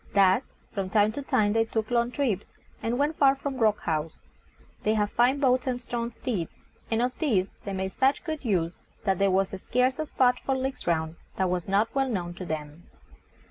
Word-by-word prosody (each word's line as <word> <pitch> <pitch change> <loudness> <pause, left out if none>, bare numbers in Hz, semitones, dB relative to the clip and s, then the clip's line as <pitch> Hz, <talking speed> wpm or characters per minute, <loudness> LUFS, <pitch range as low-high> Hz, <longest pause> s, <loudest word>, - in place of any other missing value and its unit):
Thus, 195 +5 +4 0.2
from 195 -3 -2
time 210 +1 +4
to 285 - -5
time 210 -6 +2
they 225 0 +4
took 220 0 -3
long 235 0 +2
trips, 245 -7 -2 0.3
and 235 +2 -1
went 295 +3 +1
far 275 -1 +6
from 275 -1 -4
Rock 215 -2 +3
House. 160 -1 -2 0.6
They 215 +1 +2
had 210 -1 +1
fine 250 +4 +3
boats 255 -2 +2
and 250 -1 0
strong 235 -1 -3
steeds, 220 -8 -4 0.3
and 230 +1 +1
of 250 0 -2
these 210 - +1
they 200 - -3
made 190 0 -2
such 270 +5 +2
good 315 -3 -4
use 180 -7 +1 0.3
that 195 -3 +1
there 200 0 +4
was 190 0 +2
scarce 255 +3 +1
a 310 - -2
spot 250 -3 +3
for 270 -1 0
leagues 265 -4 -4
round 160 -1 0 0.2
that 185 -1 +1
was 180 -1 -2
not 200 +3 +2
well 270 -1 +1
known 175 -6 -2
to 180 +1 -7
them. 155 +1 -6
220 Hz, 205 wpm, -27 LUFS, 190-255 Hz, 0.6 s, far